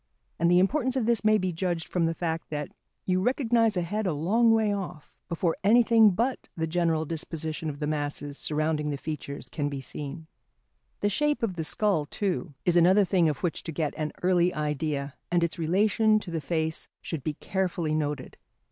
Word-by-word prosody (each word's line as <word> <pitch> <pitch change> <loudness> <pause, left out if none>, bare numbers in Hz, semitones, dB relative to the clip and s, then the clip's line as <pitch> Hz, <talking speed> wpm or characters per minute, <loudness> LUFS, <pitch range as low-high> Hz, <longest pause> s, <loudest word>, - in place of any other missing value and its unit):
And 170 +1 +3
the 175 - +5
importance 255 +7 +2
of 255 -4 +1
this 230 -2 +2
may 215 0 +5
be 185 -3 -1
judged 170 -1 -2
from 170 -2 +1
the 165 - -1
fact 165 -1 -3
that 150 -1 -3 0.4
you 185 0 +1
recognise 230 -3 +2
a 175 - +1
head 210 +4 -2
a 175 - +1
long 215 +10 +3
way 220 -2 +3
off, 180 -6 -6
before 170 0 0
anything 225 +1 +6
but 235 +7 -1
the 160 - 0
general 165 -1 +1
disposition 160 0 -4
of 145 - -6
the 150 - -3
masses 145 -1 -3
surrounding 155 0 0
the 145 - -2
features 140 -2 -6
can 145 +3 -2
be 140 -1 -4
seen. 145 +4 -5 0.8
The 205 - +2
shape 295 +5 +1
of 195 -6 0
the 165 - -2
skull, 165 -3 0
too, 180 -4 -2
is 175 - +3
another 185 +4 +6
thing 175 -3 +3
of 150 - -4
which 175 - -1
to 165 - -6
get 150 -1 -2
an 155 -1 -2
early 180 -1 +3
idea, 150 -2 -2 0.2
and 175 -1 +2
its 170 0 -2
relation 210 +6 +3
to 175 - -8
the 165 -2 -2
face 160 +1 -2 0.2
should 160 -6 -4
be 155 -2 -2
carefully 180 -4 -1
noted. 150 -3 -2
170 Hz, 195 wpm, -27 LUFS, 155-200 Hz, 0.8 s, anything